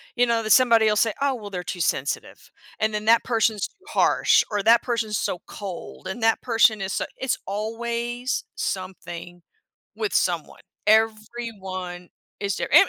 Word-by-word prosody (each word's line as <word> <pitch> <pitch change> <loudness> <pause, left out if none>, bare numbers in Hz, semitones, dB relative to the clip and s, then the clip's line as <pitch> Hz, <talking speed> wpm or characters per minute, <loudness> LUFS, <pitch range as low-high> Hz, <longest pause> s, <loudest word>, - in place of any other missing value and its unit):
you 245 - +4
know, 230 -1 +1
that 215 - -1
somebody'll 230 -4 +5
say, 220 0 +2
"Oh, 275 -2 +2
well, 210 -3 -8
they're 180 -2 -5
too 175 0 -4
sensitive," 140 -3 -2 0.3
and 220 0 +1
then, 210 0 -2
"That 230 +1 +5
person's 225 -3 +1
too 405 -2 -32
harsh," - - +4
or, 205 -2 -1
"That 230 +2 +6
person's 230 -4 -1
so 180 - -2
cold," 190 -2 -8
and, 225 +5 -5
"That 225 0 +3
person 225 -2 +3
is 190 -1 -2
s" - - -2
it's 260 -2 -1
always 235 +4 -3
something 175 -2 -5 0.5
with 430 -2 -2
someone. - - 0 0.3
Everyone 215 -5 -1 0.3
is 200 -2 -1
different, 370 - +6
220 Hz, 160 wpm, -24 LUFS, 190-235 Hz, 0.5 s, That